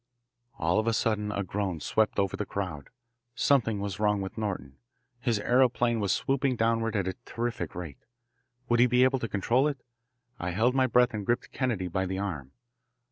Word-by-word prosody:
All 85 Hz, +4 st, +2 dB
of 110 Hz, -, -1 dB
a 115 Hz, -, +3 dB
sudden 105 Hz, -1 st, 0 dB
a 100 Hz, -1 st, -2 dB
groan 95 Hz, -2 st, -2 dB
swept 110 Hz, +7 st, +1 dB
over 100 Hz, -1 st, +1 dB
the -, -, -2 dB
crowd. 85 Hz, -8 st, -4 dB, 0.5 s
Something 115 Hz, -7 st, +2 dB
was 100 Hz, -1 st, -4 dB
wrong 105 Hz, -1 st, +2 dB
with 95 Hz, -1 st, -5 dB
Norton. 95 Hz, -12 st, -4 dB, 0.4 s
His 120 Hz, -3 st, +1 dB
aeroplane 120 Hz, +1 st, +2 dB
was 100 Hz, -2 st, 0 dB
swooping 135 Hz, +2 st, +1 dB
downward 115 Hz, -1 st, +1 dB
at 100 Hz, -3 st, 0 dB
a 95 Hz, -, -1 dB
terrific 115 Hz, -8 st, -4 dB
rate. 85 Hz, -6 st, -7 dB, 0.7 s
Would 120 Hz, 0 st, +2 dB
he 125 Hz, -, +6 dB
be 125 Hz, +1 st, +4 dB
able 130 Hz, +1 st, +3 dB
to 115 Hz, -, -3 dB
control 120 Hz, +8 st, +2 dB
it? 145 Hz, -2 st, -2 dB, 0.6 s
I 90 Hz, -, -2 dB
held 115 Hz, +7 st, +2 dB
my 130 Hz, -1 st, +3 dB
breath 125 Hz, 0 st, +3 dB
and 105 Hz, -1 st, -3 dB
gripped 120 Hz, +4 st, -1 dB
Kennedy 115 Hz, -8 st, -1 dB
by 95 Hz, +2 st, -1 dB
the 95 Hz, +1 st, -3 dB
arm. 80 Hz, -10 st, -4 dB
105 Hz, 190 wpm, -28 LUFS, 95-120 Hz, 0.7 s, he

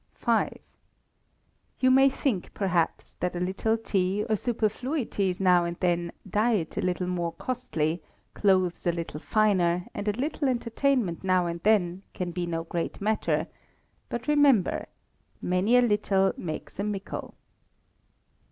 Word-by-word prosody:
v. -, -, +2 dB, 1.3 s
You 255 Hz, 0 st, +4 dB
may 270 Hz, +1 st, +6 dB
think, 260 Hz, -8 st, -2 dB
perhaps, 180 Hz, -5 st, 0 dB
that 180 Hz, 0 st, -1 dB
a -, -, -2 dB
little 195 Hz, +5 st, 0 dB
tea, 200 Hz, -2 st, 0 dB
or 220 Hz, -, +2 dB
superfluities 220 Hz, -, -1 dB
now 180 Hz, -2 st, +5 dB
and 170 Hz, 0 st, -3 dB
then, 175 Hz, -1 st, 0 dB, 0.2 s
diet 210 Hz, -4 st, +1 dB
a -, -, -1 dB
little 180 Hz, 0 st, -1 dB
more 175 Hz, -2 st, -2 dB
costly, 170 Hz, -11 st, -2 dB, 0.3 s
clothes 185 Hz, -4 st, +2 dB
a -, -, +5 dB
little 165 Hz, -3 st, -5 dB
finer, 180 Hz, -4 st, +2 dB
and 205 Hz, +1 st, -5 dB
a -, -, +4 dB
little 290 Hz, 0 st, 0 dB
entertainment 235 Hz, -6 st, 0 dB
now 185 Hz, -1 st, +3 dB
and 170 Hz, 0 st, -4 dB
then, 190 Hz, -4 st, +2 dB
can 180 Hz, -1 st, -3 dB
be 175 Hz, 0 st, -3 dB
no 165 Hz, -1 st, -2 dB
great 170 Hz, 0 st, -4 dB
matter; 215 Hz, +2 st, 0 dB, 0.6 s
but 240 Hz, +3 st, -4 dB
remember, 285 Hz, -9 st, +3 dB, 0.5 s
"Many 185 Hz, +7 st, +2 dB
a 245 Hz, -, +5 dB
little 205 Hz, -4 st, +2 dB
makes 160 Hz, +2 st, -6 dB
a -, -, 0 dB
mickle." 205 Hz, -2 st, -5 dB
190 Hz, 140 wpm, -27 LUFS, 175-225 Hz, 1.3 s, may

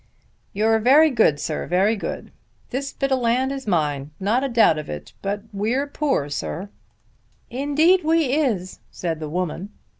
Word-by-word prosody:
"You're 220 Hz, +2 st, +2 dB
very 290 Hz, +7 st, +5 dB
good, 215 Hz, -, +3 dB
sir; 155 Hz, +1 st, -3 dB
very 195 Hz, +5 st, +2 dB
good. 205 Hz, -, -6 dB, 0.4 s
This 275 Hz, +2 st, -3 dB
bit 275 Hz, 0 st, -2 dB
of 265 Hz, -, +2 dB
land 250 Hz, +3 st, +1 dB
is 270 Hz, -3 st, -6 dB
mine; 150 Hz, -6 st, 0 dB
not 220 Hz, +7 st, +1 dB
a 275 Hz, -, -1 dB
doubt 225 Hz, -10 st, +4 dB
of 150 Hz, -, -8 dB
it; 75 Hz, 0 st, -7 dB
but 200 Hz, +1 st, -3 dB
we're 225 Hz, +8 st, 0 dB
poor, 280 Hz, -, -1 dB
sir." 170 Hz, +6 st, -4 dB, 0.8 s
"Indeed 300 Hz, +8 st, +3 dB
we 315 Hz, -4 st, +2 dB
is," 225 Hz, -, -1 dB
said 165 Hz, -3 st, -4 dB
the 155 Hz, -1 st, -5 dB
woman. 180 Hz, +3 st, -3 dB
225 Hz, 160 wpm, -22 LUFS, 180-275 Hz, 0.8 s, very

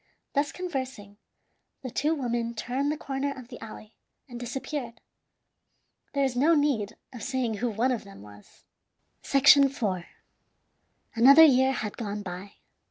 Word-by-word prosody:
Thus 285 Hz, 0 st, 0 dB
conversing, 260 Hz, -, -6 dB, 0.7 s
the 255 Hz, -, -5 dB
two 305 Hz, +7 st, 0 dB
women 235 Hz, -4 st, -2 dB
turned 255 Hz, +6 st, -2 dB
the 305 Hz, -, -3 dB
corner 275 Hz, 0 st, -3 dB
of 250 Hz, -2 st, -11 dB
the 245 Hz, -, -10 dB
alley, 215 Hz, 0 st, -11 dB, 0.3 s
and 240 Hz, -2 st, -9 dB
disappeared. 245 Hz, 0 st, -5 dB, 1.1 s
There 280 Hz, -1 st, +1 dB
is 265 Hz, -2 st, 0 dB
no 305 Hz, +7 st, +4 dB
need 250 Hz, -8 st, 0 dB, 0.2 s
of 240 Hz, -, -9 dB
saying 255 Hz, -5 st, -2 dB
who 245 Hz, +3 st, -1 dB
one 230 Hz, +4 st, 0 dB
of 245 Hz, -, -2 dB
them 195 Hz, -, -13 dB
was. 105 Hz, 0 st, -17 dB, 0.6 s
IV. 275 Hz, -1 st, +5 dB, 1.3 s
Another 275 Hz, +6 st, +8 dB
year 265 Hz, -2 st, +4 dB
had 215 Hz, -5 st, -4 dB
gone 210 Hz, -2 st, -4 dB
by. 185 Hz, +2 st, -8 dB
250 Hz, 140 wpm, -27 LUFS, 225-275 Hz, 1.3 s, Another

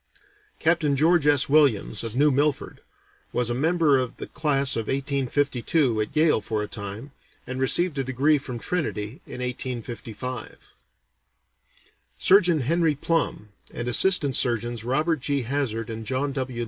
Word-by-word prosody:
Captain 160 Hz, -3 st, +1 dB
George 160 Hz, +1 st, +3 dB
S. 145 Hz, -2 st, +4 dB
Williams, 135 Hz, -8 st, +2 dB
of 115 Hz, 0 st, -5 dB
New 145 Hz, +3 st, +4 dB
Milford, 145 Hz, +1 st, -1 dB, 0.5 s
was 120 Hz, -1 st, -1 dB
a -, -, 0 dB
member 155 Hz, +1 st, +2 dB
of 125 Hz, -2 st, -4 dB
the -, -, -6 dB
class 140 Hz, -3 st, 0 dB
of 115 Hz, -1 st, -3 dB
1852 135 Hz, -2 st, 0 dB
at 105 Hz, -, -5 dB
Yale 155 Hz, -6 st, +3 dB
for 105 Hz, 0 st, -3 dB
a -, -, -5 dB
time, 105 Hz, +6 st, -7 dB, 0.3 s
and 130 Hz, +1 st, -5 dB
received 145 Hz, +3 st, +1 dB
a -, -, 0 dB
degree 135 Hz, +4 st, +2 dB
from 125 Hz, -3 st, -6 dB
Trinity 125 Hz, -, -3 dB
in 125 Hz, -, -8 dB
1855. 125 Hz, -1 st, -6 dB, 1.4 s
Surgeon 175 Hz, -5 st, +4 dB
Henry 160 Hz, +3 st, +1 dB
Plumb, 145 Hz, -8 st, -2 dB, 0.2 s
and 120 Hz, -, -5 dB
Assistant 145 Hz, +1 st, +4 dB
Surgeons 120 Hz, -2 st, +1 dB
Robert 150 Hz, +6 st, 0 dB
G. 140 Hz, +1 st, -1 dB
Hazzard 120 Hz, -3 st, -2 dB
and 110 Hz, 0 st, -6 dB
John 130 Hz, +5 st, -2 dB
W. 130 Hz, -3 st, -4 dB
135 Hz, 145 wpm, -24 LUFS, 120-150 Hz, 1.4 s, S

